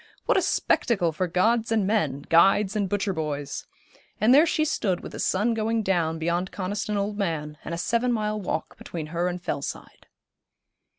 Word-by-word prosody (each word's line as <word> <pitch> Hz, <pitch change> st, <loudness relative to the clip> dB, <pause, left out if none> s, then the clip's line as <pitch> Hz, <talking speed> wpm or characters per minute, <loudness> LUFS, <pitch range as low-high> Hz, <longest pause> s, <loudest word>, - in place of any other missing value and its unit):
What -, -, +3 dB
a -, -, +4 dB
spectacle 185 Hz, -8 st, +1 dB
for 180 Hz, +4 st, -1 dB
gods 225 Hz, +6 st, +1 dB
and 220 Hz, -3 st, +2 dB
men, 155 Hz, -10 st, 0 dB
guides 195 Hz, +4 st, +4 dB
and 200 Hz, -3 st, 0 dB
butcher 200 Hz, 0 st, 0 dB
boys. 150 Hz, -3 st, -4 dB, 0.5 s
And 220 Hz, +5 st, +5 dB
there 300 Hz, +5 st, +7 dB
she 310 Hz, -1 st, +1 dB
stood 195 Hz, -, 0 dB
with -, -, -8 dB
the -, -, -8 dB
sun 210 Hz, +5 st, +1 dB
going 225 Hz, 0 st, 0 dB
down 170 Hz, -4 st, +1 dB
beyond 170 Hz, +3 st, -1 dB
Coniston 205 Hz, +2 st, -3 dB
Old 205 Hz, +1 st, -2 dB
Man, 150 Hz, -5 st, -2 dB
and 170 Hz, -, -4 dB
a -, -, -5 dB
seven 235 Hz, +7 st, +1 dB
mile 215 Hz, -2 st, -1 dB
walk 160 Hz, -4 st, -4 dB
between 165 Hz, -3 st, -6 dB
her 170 Hz, +1 st, 0 dB
and 180 Hz, 0 st, -3 dB
Fellside. 140 Hz, -5 st, -6 dB
195 Hz, 180 wpm, -25 LUFS, 170-215 Hz, 0.5 s, there